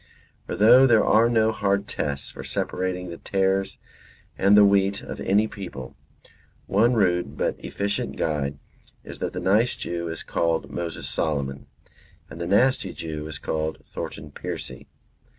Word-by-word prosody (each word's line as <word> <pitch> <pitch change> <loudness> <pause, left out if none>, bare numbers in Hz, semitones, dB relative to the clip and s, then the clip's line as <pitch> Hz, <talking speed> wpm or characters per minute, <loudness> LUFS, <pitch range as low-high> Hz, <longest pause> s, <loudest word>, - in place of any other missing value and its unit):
For - - -3
though 125 +5 +7
there 115 -4 +5
are 115 +2 +5
no 110 -1 +3
hard 100 -1 0
tests 70 -2 -3
for - - -9
separating 90 -1 -3
the 85 - -8
tares 95 0 0 0.6
and 100 +2 +5
the 105 - +8
wheat 100 0 +2
of - - -7
any 105 +3 +2
people, 70 -12 -8 0.7
one 115 +5 +3
rude 90 -5 +1
but - - -2
efficient 100 0 -2
guide 70 -2 -1 0.5
is - - -9
that - - -3
the - - -3
nice 105 +6 +2
Jew 85 0 -4
is 80 0 -5
called 80 -5 -1
Moses 85 0 -4
Solomon, 70 -3 -2 0.6
and 85 - -8
the 85 - -2
nasty 125 +7 +2
Jew 75 -2 -5
is 80 - -6
called 80 0 -2
Thornton 75 - -7
Percy. 70 0 -7
95 Hz, 150 wpm, -24 LUFS, 80-105 Hz, 0.7 s, the